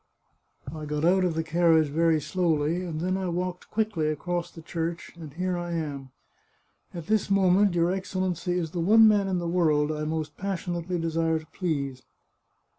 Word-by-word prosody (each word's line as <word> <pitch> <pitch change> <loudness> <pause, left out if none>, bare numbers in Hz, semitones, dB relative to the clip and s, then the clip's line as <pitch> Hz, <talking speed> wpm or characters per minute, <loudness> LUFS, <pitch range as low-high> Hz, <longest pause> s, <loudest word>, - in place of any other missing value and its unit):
I 155 -1 -6
got 150 +1 -1
out 185 +2 +4
of 175 -3 0
the 160 - 0
car 170 +1 +2
riage 160 -2 +4
very 165 +1 +2
slowly, 165 +1 0
and 160 -3 -4
then 185 +2 0
I 190 -1 -2
walked 180 +1 -4
quickly 210 -8 0
across 175 +3 -2
the 165 - -13
church, 165 +1 -4
and 160 -4 -9
here 180 +4 -2
I 175 0 -4
am. 145 -5 -4 0.8
At 170 -3 -7
this 215 +1 +1
moment 195 0 +4
your 170 +1 +2
Excellency 185 -2 -2
is 165 -3 -2
the 175 - -4
one 220 +6 +6
man 205 -2 +3
in 190 -1 0
the 175 -1 -2
world 155 -4 +2
I 150 0 -3
most 155 0 -3
passionately 180 -2 -3
desire 165 -1 0
to 155 - -8
please." 140 -7 -3
170 Hz, 185 wpm, -27 LUFS, 160-185 Hz, 0.8 s, one